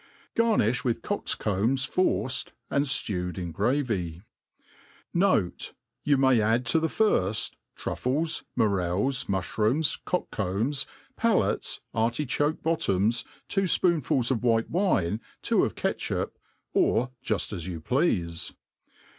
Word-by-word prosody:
Garnifli 215 Hz, -, +2 dB
with 120 Hz, -3 st, -1 dB
cocks -, -, -1 dB
combs 115 Hz, +7 st, +1 dB
forced, 130 Hz, -, 0 dB, 0.2 s
and 140 Hz, +1 st, +2 dB
Aewed 95 Hz, -10 st, -1 dB
141 90 Hz, -, -3 dB
the 85 Hz, -, -5 dB
gravy« 100 Hz, -, -1 dB, 0.9 s
Note, 170 Hz, -, +1 dB, 0.3 s
You 145 Hz, -1 st, +3 dB
may 130 Hz, -3 st, +4 dB
add 115 Hz, +3 st, +2 dB
to 165 Hz, -, +5 dB
the 160 Hz, -, +1 dB
firft, 110 Hz, -, +1 dB, 0.3 s
truffief^ 155 Hz, +6 st, -1 dB, 0.2 s
fndreIs,.n^uihrooms, 105 Hz, -, +1 dB
cocks 180 Hz, -, -2 dB
combs, 110 Hz, +8 st, -1 dB, 0.3 s
palates, -, -, +1 dB
artichoke 130 Hz, +6 st, 0 dB
bottoms, 115 Hz, -, +1 dB, 0.2 s
two 195 Hz, -1 st, +1 dB
fpoonfuls 155 Hz, -9 st, +2 dB
of 120 Hz, -, 0 dB
white 115 Hz, -2 st, +1 dB
wine, 115 Hz, -, +1 dB, 0.2 s
two -, -, +3 dB
of -, -, -1 dB
catchup, -, -, -2 dB, 0.4 s
or 125 Hz, +2 st, +2 dB
juft 105 Hz, -1 st, -1 dB
as 90 Hz, -3 st, -5 dB
you 85 Hz, -3 st, -4 dB
pleafe. 85 Hz, -, 0 dB
120 Hz, 115 wpm, -27 LUFS, 100-145 Hz, 0.9 s, to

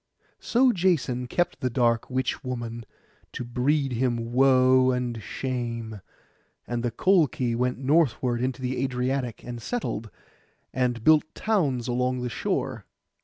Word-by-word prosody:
So 250 Hz, +2 st, +3 dB
Jason 160 Hz, -, 0 dB
kept 175 Hz, +6 st, -1 dB
the 125 Hz, -, -1 dB
dark 115 Hz, -2 st, +1 dB
witch 130 Hz, +2 st, -2 dB
maiden 120 Hz, -3 st, -5 dB, 0.5 s
to -, -, -4 dB
breed 135 Hz, +4 st, 0 dB
him 120 Hz, -1 st, -1 dB
woe 130 Hz, 0 st, +5 dB
and 125 Hz, -3 st, -2 dB
shame; 115 Hz, -4 st, -4 dB, 0.6 s
and 120 Hz, -1 st, -3 dB
the 120 Hz, -, 0 dB
Colchi 130 Hz, -, +2 dB
went 125 Hz, +1 st, 0 dB
northward 130 Hz, -4 st, +1 dB
into 130 Hz, +1 st, -2 dB
the 130 Hz, +1 st, -1 dB
Adriatic, 125 Hz, -1 st, -2 dB
and 120 Hz, -1 st, -7 dB
settled, 115 Hz, -, -3 dB, 0.6 s
and 125 Hz, -3 st, 0 dB
built 155 Hz, +1 st, +4 dB
towns 145 Hz, -, 0 dB
along 125 Hz, +1 st, 0 dB
the 125 Hz, -, -2 dB
shore. -, -, -3 dB
125 Hz, 130 wpm, -26 LUFS, 120-135 Hz, 0.6 s, woe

